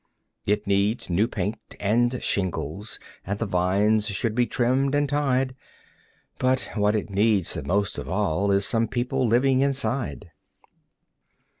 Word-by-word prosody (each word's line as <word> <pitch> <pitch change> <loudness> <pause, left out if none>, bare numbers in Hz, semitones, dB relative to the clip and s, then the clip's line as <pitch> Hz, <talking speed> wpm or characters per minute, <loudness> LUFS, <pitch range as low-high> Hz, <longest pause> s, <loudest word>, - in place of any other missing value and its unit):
It 105 +1 +1
needs 100 +1 0
new 100 +6 +2
paint 105 0 -3 0.2
and 120 +5 +1
shingles, 95 +1 -2 0.2
and 100 +2 -3
the 115 - -2
vines 100 +3 +2
should 105 +2 -1
be 120 +1 +2
trimmed 130 +3 +1
and 145 0 +2
tied; 135 -2 0 0.8
But 130 0 +1
what 105 0 +2
it 105 -1 -3
needs 100 -2 +2
the - - -4
most 100 +1 -1
of - - -7
all 100 0 0
is 100 0 +3
some 115 -1 +1
people 125 +2 -1
living 130 +3 +3
inside. 135 -8 -1
110 Hz, 140 wpm, -25 LUFS, 100-125 Hz, 0.8 s, is